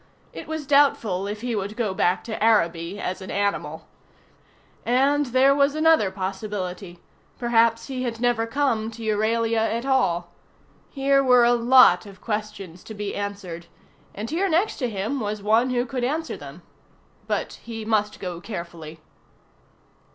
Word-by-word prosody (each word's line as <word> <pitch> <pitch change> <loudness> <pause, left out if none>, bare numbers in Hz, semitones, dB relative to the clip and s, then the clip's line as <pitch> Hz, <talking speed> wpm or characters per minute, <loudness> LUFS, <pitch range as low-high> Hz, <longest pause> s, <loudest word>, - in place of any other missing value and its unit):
It - - -8
was 315 -2 -4
doubtful 250 -9 +2
if 210 +1 -5
he 240 -1 -2
would 205 +1 -4
go 215 -5 -1
back 180 0 +1
to 220 -2 -4
Araby 175 -4 +1
as 185 +1 -4
an 190 - -8
animal. 165 -6 -2 1.0
And 275 +4 +2
then - - -10
there 265 +2 +5
was 280 +1 +2
another 315 -9 +4
possibility: 190 -1 -5 0.4
perhaps 230 -1 +2
he 260 -2 -5
had 235 -3 -3
never 240 -2 +1
come 230 -4 0
to 230 0 -10
Euralia 225 +1 +1
at 225 +2 -1
all. 175 -11 +1 0.6
Here 275 0 +2
were 250 -2 +5
a 240 - +4
lot 240 -5 +5
of 195 -2 -13
questions 210 -5 -5
to 220 - -9
be 205 -1 -4
answered, 195 -4 -6 0.5
and 210 +3 -5
here 375 +5 0
next 350 +6 +1
to 250 -4 -1
him 220 +6 -3
was 210 -2 -4
one 225 +4 +3
who 245 -1 0
could 255 0 -4
answer 315 +6 -2
them. - - -11 0.6
But - - -3
he 225 -2 -7
must 210 -1 0
go 175 -2 -6
carefully. 170 -5 -8
225 Hz, 160 wpm, -24 LUFS, 195-255 Hz, 1.0 s, there